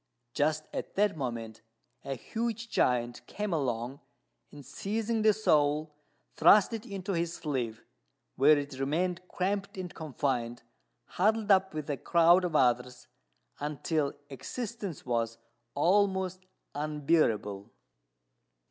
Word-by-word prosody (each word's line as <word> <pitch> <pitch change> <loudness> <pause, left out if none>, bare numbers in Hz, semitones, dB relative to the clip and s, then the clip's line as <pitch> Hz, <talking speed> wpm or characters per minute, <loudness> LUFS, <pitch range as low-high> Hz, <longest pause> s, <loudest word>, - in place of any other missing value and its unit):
Just 155 +1 +1
at - - -5
that 205 -1 +2
moment 115 -5 -5 0.4
a 135 - -3
huge 230 - -4
giant 120 -1 +1
came 210 -3 -3
along, 130 -2 -2 0.5
and, 145 -2 -12
seizing 220 - -2
the 215 0 +6
soul, 150 -7 +2 0.4
thrust 200 +7 +6
it 225 +2 -5
into 195 -2 -4
his 170 0 -1
sleeve, 125 -7 -3 0.5
where 145 +3 +6
it 140 -2 -5
remained 175 +6 0
cramped 195 +2 -2
and 180 -2 -5
confined, 130 -6 -2 0.4
huddled 215 +2 +1
up 190 -3 +4
with 155 -2 -4
a 145 -2 -2
crowd 170 +6 +4
of 175 -3 -2
others, 125 -1 +1 0.5
until 150 0 -1 0.2
existence 205 - -6
was 115 -2 -1 0.4
almost 185 +2 +1 0.3
unbearable. 140 -9 0
155 Hz, 115 wpm, -30 LUFS, 130-190 Hz, 0.5 s, the